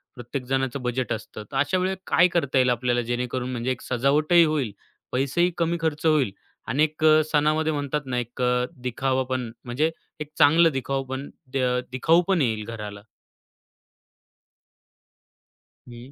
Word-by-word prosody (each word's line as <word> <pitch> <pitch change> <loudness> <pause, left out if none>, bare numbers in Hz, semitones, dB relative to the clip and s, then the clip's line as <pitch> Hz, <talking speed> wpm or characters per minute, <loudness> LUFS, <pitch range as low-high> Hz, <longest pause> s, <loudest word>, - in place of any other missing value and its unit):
प्रत्येक 125 +1 -6
जणाचं 135 0 -1
बजेट 125 +1 -2
असतं, 110 -1 -7
तर 135 - -3
अशा 145 +7 +2
वेळी 185 +1 0
काय 170 - +5
करता 165 -7 0
येईल 130 -1 +4
आपल्याला 120 0 +1
जेणेकरून 125 +1 -3
म्हणजे 125 +1 -2
एक 130 - -4
सजावटही 150 +7 +3
होईल, 150 -8 0 0.4
पैसेही 140 +7 +1
कमी 170 0 0
खर्च 160 0 -2
होईल 150 -10 +3 0.4
आणि 145 +4 +2
एक 155 0 -2
अ, 155 0 +6
सणामध्ये 155 +1 +2
म्हणतात 145 0 -2
ना, 125 -1 -2
एक 120 +1 -6
अ, 125 0 +2 0.2
दिखाऊपण 130 -1 -1
म्हणजे 140 +7 0 0.3
एक 150 0 -6
चांगलं 165 +2 +6
दिखावपण 135 0 -3 0.3
अ, 125 -1 +1
दिखाऊपण 165 +7 +3
येईल 110 -5 0
घराला? 105 -3 -7 2.9
हं. 120 +3 -11
130 Hz, 140 wpm, -24 LUFS, 125-155 Hz, 2.9 s, अ